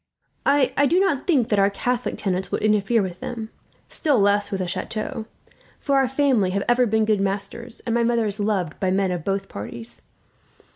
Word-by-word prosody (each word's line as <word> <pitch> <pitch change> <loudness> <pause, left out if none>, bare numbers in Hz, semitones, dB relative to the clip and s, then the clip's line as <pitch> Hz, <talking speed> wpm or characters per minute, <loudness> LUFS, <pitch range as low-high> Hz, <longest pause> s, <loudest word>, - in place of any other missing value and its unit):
I 280 0 +3
do 355 - +4
not 385 -9 +1
think 265 -10 +3
that 210 - +2
our 195 0 +4
Catholic 245 +4 -2
tenants 190 -2 -2
would - - -2
interfere 215 +1 +2
with 180 -2 -5
them, 225 -2 -6 0.4
still 290 -5 +1
less 205 0 +2
with 195 -2 -3
the 185 - -2
chateau; 215 - -4 0.5
for 280 -1 +1
our 270 -1 +3
family 260 -7 +2
have 200 - 0
ever 245 0 +4
been 220 0 +2
good 215 -2 +2
masters, 200 +4 -3
and 230 - -1
my 235 - +2
mother 230 -1 +2
is 210 0 -3
loved 200 -6 -1
by 190 - 0
men 190 0 +1
of 175 -3 -3
both 195 +1 -2
parties. 115 +3 -4
215 Hz, 195 wpm, -23 LUFS, 195-245 Hz, 0.5 s, do